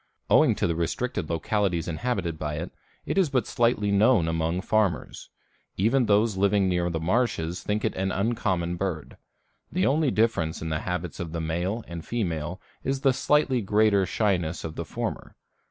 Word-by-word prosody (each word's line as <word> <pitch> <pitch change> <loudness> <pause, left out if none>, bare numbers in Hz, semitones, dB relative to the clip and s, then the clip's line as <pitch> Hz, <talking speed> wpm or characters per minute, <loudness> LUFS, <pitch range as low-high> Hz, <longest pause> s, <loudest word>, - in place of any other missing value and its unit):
Owing - - +5
to - - 0
the 85 - +1
restricted 85 +3 -2
localities 85 +1 0
inhabited 85 -2 -2
by 75 -1 -3
it, 85 +4 -5 0.3
it - - 0
is 180 -6 +3
but 130 -3 +1
slightly 115 -4 +1
known 100 -3 +4
among 80 +2 -1
farmers; 100 -6 -1 0.5
even 115 +5 +2
those 105 0 +3
living 100 0 +3
near 90 -1 +1
the 80 -1 -2
marshes 90 -2 0
think 105 +3 -1
it - - 0
an 95 +1 -1
uncommon 95 -5 -1
bird. 85 -5 -4 0.5
The 95 - +1
only 145 +4 +2
difference 110 -9 +1
in 80 - -4
the 80 -1 -1
habits 90 -2 -3
of 85 -2 -5
the 85 - -2
male 90 +7 -2
and 85 -1 -7
female 90 -7 -3 0.2
is 135 0 -1
the 135 -2 +4
slightly 135 -1 +2
greater 105 -1 +3
shyness 90 -5 0
of 80 -1 -6
the 85 - -4
former. - - -5
95 Hz, 170 wpm, -26 LUFS, 85-110 Hz, 0.5 s, Owing